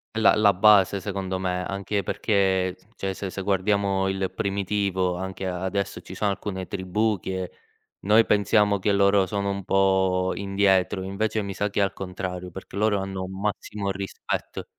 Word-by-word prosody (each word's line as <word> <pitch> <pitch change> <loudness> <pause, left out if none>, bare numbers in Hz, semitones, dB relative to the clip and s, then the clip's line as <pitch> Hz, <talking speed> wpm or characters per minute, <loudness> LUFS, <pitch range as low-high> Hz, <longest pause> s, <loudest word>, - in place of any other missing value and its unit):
È - - 0
la 110 - +6
la 105 -2 +5
base 100 -1 +5
secondo 95 -2 -3
me, 90 -1 -1
anche 100 +1 -2
perché 95 -2 +1 0.2
cioè 95 0 -3
se 95 0 -5
se 95 - -5
guardiamo 100 0 +1
il 95 -1 -1
primitivo, 100 -2 -1
anche 95 +1 -5
a 90 0 -3
adesso 100 +1 -2
ci - - -10
sono 105 -1 0
alcune 95 -1 -5
tribù 100 +2 -1
che 95 0 -4 0.5
noi 110 +3 +5
pensiamo 105 0 +3
che 100 +2 +1
loro 100 0 +4
sono 100 +1 -2
un 100 -1 -4
po' 95 -1 +2
indietro, 95 -1 +1
invece 110 +3 -1
mi 100 -1 -4
sa 105 +2 -1
che 100 - 0
è - - +5
al 95 - 0
contrario, 90 -1 -5
perché 95 +3 -9
loro 105 -1 +2
hanno 95 -1 -4
un 95 +1 -7
massimo 100 -1 -2
rispetto. 95 0 -4
95 Hz, 175 wpm, -25 LUFS, 95-100 Hz, 0.5 s, la